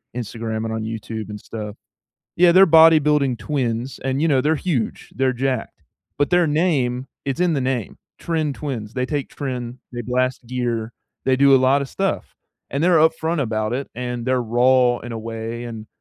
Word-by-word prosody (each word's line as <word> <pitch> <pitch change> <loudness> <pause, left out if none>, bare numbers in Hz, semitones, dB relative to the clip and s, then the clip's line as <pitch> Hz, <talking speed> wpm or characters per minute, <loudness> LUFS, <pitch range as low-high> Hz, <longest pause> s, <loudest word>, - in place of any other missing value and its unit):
Instagram 115 -1 -4
and 110 - -3
on 110 - -3
YouTube 110 -1 -5
and 105 0 -6
stuff. 105 -1 -7 0.6
Yeah, 175 0 +6
they're 190 +2 +7
bodybuilding 150 -5 +5
twins, 120 0 -2
and, 135 +3 0
you - - +3
know, 135 -4 +3
they're 155 +4 +2
huge, 140 -8 -3
they're 130 0 +1
jacked, 130 -8 -3 0.4
but 145 - +1
their 175 -1 +4
name 145 -6 +1 0.2
it's 135 +4 -2
in 180 -1 +3
the 140 - 0
name, 130 -5 -2 0.2
"Tren 155 -4 -1
Twins," 120 -8 -5
they 125 -1 0
take 145 0 -2
tren, 125 -3 -4 0.2
they 120 - -4
blast 125 +1 -1
gear, 120 -2 -2 0.3
they 130 -1 +3
do 140 0 +6
a - - +6
lot 135 +2 +3
of 135 - -6
stuff, 195 +5 -2 0.4
and 140 - -1
they're 175 -1 +5
upfront 160 +1 +2
about 110 -2 -2
it, 135 +2 -3
and 125 0 -4
they're 130 -1 +1
raw 120 +1 +3
in 120 0 -7
a 115 - -4
way, 115 +1 -5
and, 115 -2 -7
130 Hz, 185 wpm, -21 LUFS, 115-145 Hz, 0.6 s, they're